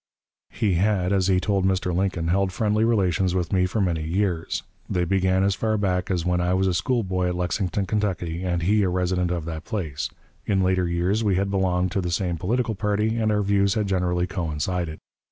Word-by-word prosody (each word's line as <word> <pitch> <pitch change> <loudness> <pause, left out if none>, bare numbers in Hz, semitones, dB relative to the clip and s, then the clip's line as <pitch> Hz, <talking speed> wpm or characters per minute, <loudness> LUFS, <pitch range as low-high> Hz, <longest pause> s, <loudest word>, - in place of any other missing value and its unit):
He 105 -4 0
had, 95 +1 +1
as 95 -2 +2
he 95 -1 +3
told 100 0 0
Mr. 95 -2 0
Lincoln, 90 -3 0
held 95 +1 +2
friendly 105 +2 +1
relations 95 -5 +2
with 90 -1 -1
me 90 -1 +3
for 110 - -2
many 85 -5 0
years; 85 +1 -1 0.3
they 90 -1 0
began 95 +1 +2
as 100 0 +2
far 110 +2 0
back 90 -3 0
as 90 -3 -1
when 90 0 +1
I 90 +1 +1
was 95 +1 +2
a 95 - +1
schoolboy 95 -2 0
at 90 - -1
Lexington, 90 +2 -1
Kentucky, 90 -5 -2
and 85 -2 -1
he 105 +4 +3
a 95 - +2
resident 90 0 0
of 85 -3 -2
that 80 -1 -5
place. 85 - -3 0.4
In 95 -2 +2
later 90 -1 +2
years 90 +6 0
we 100 -3 +2
had 100 +1 0
belonged 95 -2 +1
to 95 - 0
the 90 - -2
same 85 0 -1
political 115 +5 0
party, 105 +2 0
and 110 -1 +1
our 105 -1 +1
views 100 -1 +2
had 105 -2 +1
generally 90 -2 0
coincided. 85 -2 -3
95 Hz, 210 wpm, -24 LUFS, 90-100 Hz, 0.4 s, he